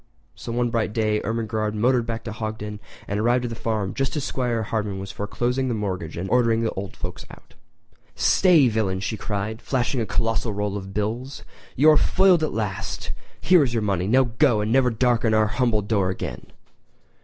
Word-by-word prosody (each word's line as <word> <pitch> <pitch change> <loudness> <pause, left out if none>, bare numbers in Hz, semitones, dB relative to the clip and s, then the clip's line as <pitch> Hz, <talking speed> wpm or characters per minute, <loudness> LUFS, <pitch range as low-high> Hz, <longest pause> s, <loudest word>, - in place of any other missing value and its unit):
So - - -8
one 120 0 0
bright 110 -3 -1
day 110 -1 +1
Ermengarde 110 -1 -2
motored 120 +1 +2
back 115 -1 -4
to 115 - -5
Hogton 110 -1 -5 0.3
and 100 +1 -2
arrived 120 +3 +2
at - - -3
the 115 - -5
farm 110 -4 -2
just 135 +2 -2
as 145 - -2
'Squire 120 -4 -1
Hardman 105 -2 -2
was 95 0 -6
foreclosing 120 +6 -2
the 120 - -1
mortgage 95 -6 -4
and 90 +3 -3
ordering 115 -2 +3
the 115 - 0
old 95 0 -6
folks - - -6
out. - - -15 0.6
"Stay, 170 -8 +5
villain!" 105 -5 0
she 100 +3 -3
cried, 105 +1 -4
flashing 125 -1 -1
a 110 - -2
colossal 115 0 0
roll 105 0 -2
of 95 -1 -6
bills. 115 +7 -3 0.3
"You 155 +4 +6
are 150 - +5
foiled 185 +1 +4
at 155 - 0
last! 105 -4 -3 0.3
Here 180 -2 +5
is 120 -3 -2
your 115 - 0
money—now 100 +6 +2 0.2
go, 130 -8 +4
and 105 +1 -1
never 130 0 +4
darken 120 -1 +2
our 110 0 +4
humble 115 -1 +1
door 100 -3 +1
again!" 95 - -5
110 Hz, 190 wpm, -23 LUFS, 105-125 Hz, 0.6 s, You